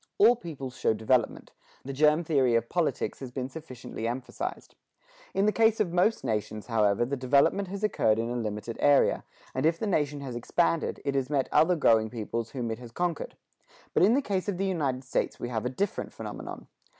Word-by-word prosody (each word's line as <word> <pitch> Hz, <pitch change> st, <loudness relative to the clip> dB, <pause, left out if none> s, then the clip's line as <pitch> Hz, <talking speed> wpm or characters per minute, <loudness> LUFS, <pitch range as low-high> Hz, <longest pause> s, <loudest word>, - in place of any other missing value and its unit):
All 245 Hz, -, +7 dB
peoples 140 Hz, -, -7 dB
show 110 Hz, -, +1 dB
development; 110 Hz, +2 st, 0 dB, 0.3 s
the 135 Hz, -, -4 dB
germ 150 Hz, +4 st, +4 dB
theory 135 Hz, -7 st, +2 dB
of 115 Hz, 0 st, 0 dB
politics 175 Hz, -3 st, -1 dB
has 130 Hz, -, -6 dB
been 130 Hz, +1 st, -4 dB
sufficiently 130 Hz, -6 st, -7 dB
emphasized. 130 Hz, -, -5 dB, 0.6 s
In 195 Hz, -, +3 dB
the 210 Hz, -, +4 dB
case 225 Hz, 0 st, +3 dB
of 185 Hz, -6 st, 0 dB
most 180 Hz, +3 st, +2 dB
nations, 110 Hz, -3 st, -2 dB
however, 110 Hz, -1 st, +2 dB
the 140 Hz, +3 st, -2 dB
development 140 Hz, +9 st, +2 dB
has 200 Hz, +3 st, -6 dB
occurred 110 Hz, -, +2 dB
in 115 Hz, +1 st, -1 dB
a -, -, -2 dB
limited 110 Hz, 0 st, -4 dB
area; 145 Hz, -1 st, +4 dB, 0.3 s
and 130 Hz, -, -1 dB
if 165 Hz, +2 st, +3 dB
the 220 Hz, -, -3 dB
nation 150 Hz, -7 st, 0 dB
has 130 Hz, -3 st, -6 dB
expanded, 165 Hz, +7 st, 0 dB
it 140 Hz, -, 0 dB
has 135 Hz, -1 st, -1 dB
met 140 Hz, -3 st, 0 dB
other 180 Hz, +3 st, +4 dB
growing 110 Hz, -8 st, +3 dB
peoples 115 Hz, 0 st, -4 dB
whom 120 Hz, -4 st, -3 dB
it 110 Hz, -, -4 dB
has 120 Hz, -1 st, -10 dB
conquered. 175 Hz, +4 st, -3 dB, 0.6 s
But -, -, +3 dB
in 210 Hz, +7 st, +6 dB
the 280 Hz, -, +1 dB
case 195 Hz, -2 st, -1 dB
of 190 Hz, -, -2 dB
the 195 Hz, -, 0 dB
United 140 Hz, -9 st, -1 dB
States 130 Hz, -, -2 dB
we 120 Hz, -, -4 dB
have 115 Hz, 0 st, -2 dB
a -, -, -1 dB
different 195 Hz, +11 st, -3 dB
phenomenon. -, -, -7 dB
135 Hz, 200 wpm, -28 LUFS, 120-175 Hz, 0.6 s, All